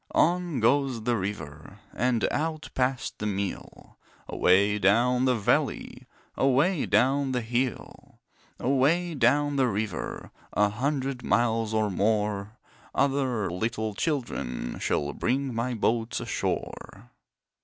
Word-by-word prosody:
On 175 -3 +2
goes 125 0 +2
the 120 +1 +1
river 80 -8 -6 0.2
And 125 -2 +1
out 155 0 -3
past 130 0 -1
the 105 - -2
mill, 100 -1 -5 0.3
Away 100 +3 +3
down 120 +6 +3
the 130 -1 +3
valley, 105 -4 -1 0.3
Away 140 +6 +2
down 135 +5 +2
the 125 - 0
hill. 120 +1 -4 0.4
Away 150 +7 +2
down 145 +2 +2
the 130 -2 +3
river, 105 -1 -4 0.2
A 105 0 +3
hundred 135 +3 -2
miles 115 -2 +1
or 110 -2 +1
more, 105 +1 0 0.4
Other 130 -8 +1
little 110 +3 -2
children 100 - -3
Shall 70 0 -1
bring 135 +1 -1
my 120 +2 -2
boats 115 +1 0
ashore. 115 +5 -4
120 Hz, 115 wpm, -27 LUFS, 105-135 Hz, 0.4 s, Away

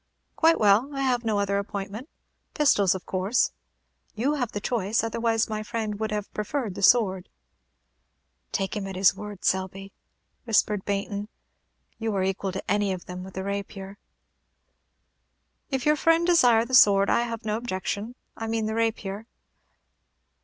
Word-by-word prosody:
"Quite 330 0 +4
well. 210 +5 +4
I 275 - -2
have 250 -3 +1
no 220 -2 0
other 200 0 +1
appointment. 200 +6 -6 0.5
Pistols, 205 - +3
of 185 - -7
course?" 190 +6 +1 0.6
"You 255 +7 0
have 245 -6 -2
the 205 - -3
choice, 220 0 0
otherwise 225 0 0
my 215 -1 -3
friend 215 -2 -4
would 220 0 -1
have 210 -1 -4
preferred 215 0 -3
the 200 - -7
sword." 195 -4 +3 1.2
"Take 195 +1 -2
him 200 -2 -3
at 190 - -6
his 190 0 +4
word, 210 -2 -8
Selby," 190 +1 -1 0.5
whispered 210 -3 +1
Baynton; 200 +1 -3 0.7
"you 225 -2 -2
are 190 - +1
equal 195 0 -1
to 190 - -5
any 205 -1 +1
of 185 -2 -5
them 180 0 -7
with 190 0 -11
the 190 - -3
rapier." 200 0 -5 1.7
"If 265 -3 -2
your 300 0 +4
friend 330 +2 +3
desire 245 -10 +5
the 260 - -9
sword, 200 -5 +6
I - - +3
have 230 -2 -4
no 210 -1 0
objection, 220 0 -4 0.2
I 225 - -5
mean 225 -1 -1
the 220 - -2
rapier." 220 -2 -2
210 Hz, 160 wpm, -26 LUFS, 195-230 Hz, 1.7 s, sword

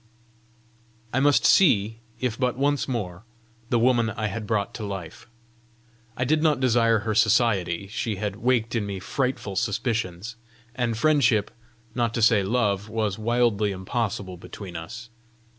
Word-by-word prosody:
I 130 - +2
must 145 +1 +3
see, 110 - +4 0.2
if 125 -3 -1
but 125 0 -1
once 145 +1 +1
more, 100 -9 -4 0.5
the 120 - +2
woman 120 -1 +3
I 110 0 -3
had 105 +1 -5
brought 110 +1 -1
to 110 - -6
life! 95 -4 -7 0.9
I 125 - 0
did 155 +5 +2
not 155 -4 +2
desire 115 -3 +3
her 110 +1 -2
society: 105 -5 +2
she 110 +1 -3
had 100 0 -4
waked 120 -1 +1
in 110 -4 -1
me 100 -1 -4
frightful 125 -2 -2
suspicions; 105 0 -2 0.4
and 120 -3 -1
friendship, 120 -7 +3 0.4
not 120 -2 -1
to 115 - -1
say 110 -2 +5
love, 105 -1 0
was 110 -2 -2
wildly 115 -2 +1
impossible 95 -1 -3
between 90 +1 -10
us! 115 +8 -8
115 Hz, 145 wpm, -25 LUFS, 100-120 Hz, 0.9 s, say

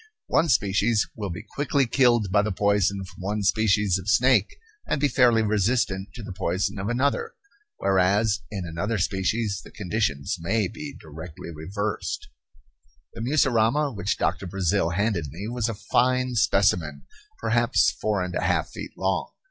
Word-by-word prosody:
One 165 +2 +2
species 105 -1 +2
will 105 -3 -4
be 90 +5 -6
quickly 140 -1 0
killed 120 -5 +3
by 100 +1 +4
the 105 +1 -2
poison 100 0 +1
from 90 0 -13
one 105 +2 -2
species 100 -2 +2
of 95 +3 -5
snake, 120 -2 +3 0.3
and - - 0
be 145 - +3
fairly 120 -5 +4
resistant 105 -2 0
to 120 - -8
the 100 - -7
poison 95 +2 -1
of 100 +3 -3
another; 140 - 0 0.4
whereas 100 +2 +2
in 95 -4 -5
another 85 +7 -2
species 95 +2 -1
the - - -13
conditions 100 -8 -2
may 100 +5 0
be 145 +8 -8
directly 80 +2 -9
reversed. 100 +7 -4 0.8
The - - -7
mussurama 135 +1 +2
which 100 +1 -1
Doctor 90 +2 -1
Brazil 95 -1 0
handed 95 -3 0
me 90 +9 -7
was 120 -1 -1
a 115 - -3
fine 125 +4 +1
specimen, 90 -9 +2 0.3
perhaps - - +2
four - - -1
and - - -5
a - - -1
half - - 0
feet - - -8
long. - - -1
105 Hz, 155 wpm, -25 LUFS, 95-115 Hz, 0.8 s, by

